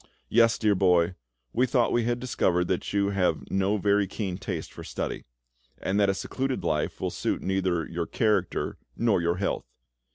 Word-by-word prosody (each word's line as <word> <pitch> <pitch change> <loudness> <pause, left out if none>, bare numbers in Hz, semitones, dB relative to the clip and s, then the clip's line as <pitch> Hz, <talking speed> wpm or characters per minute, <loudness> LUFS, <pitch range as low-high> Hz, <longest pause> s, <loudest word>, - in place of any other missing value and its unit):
Yes, 115 -1 +4
dear 105 -2 +3
boy, 90 -2 +3 0.4
we 125 +2 +3
thought 120 -1 +2
we 120 -1 +2
had 120 0 0
discovered 90 -8 +1
that 90 - -1
you 100 0 +1
have 95 -2 +1
no 95 +2 +2
very 100 0 +2
keen 95 -1 -4
taste 100 - -5
for - - -9
study, - - -4 0.5
and 100 +2 -1
that 100 -1 +4
a 95 - +1
secluded 130 +5 -2
life 75 -1 -1
will - - -1
suit - - -2
neither 95 -3 0
your 85 -1 -3
character 105 -5 0 0.2
nor 115 -6 +2
your 85 +1 +1
health. 100 - -2
100 Hz, 175 wpm, -27 LUFS, 90-110 Hz, 0.5 s, Yes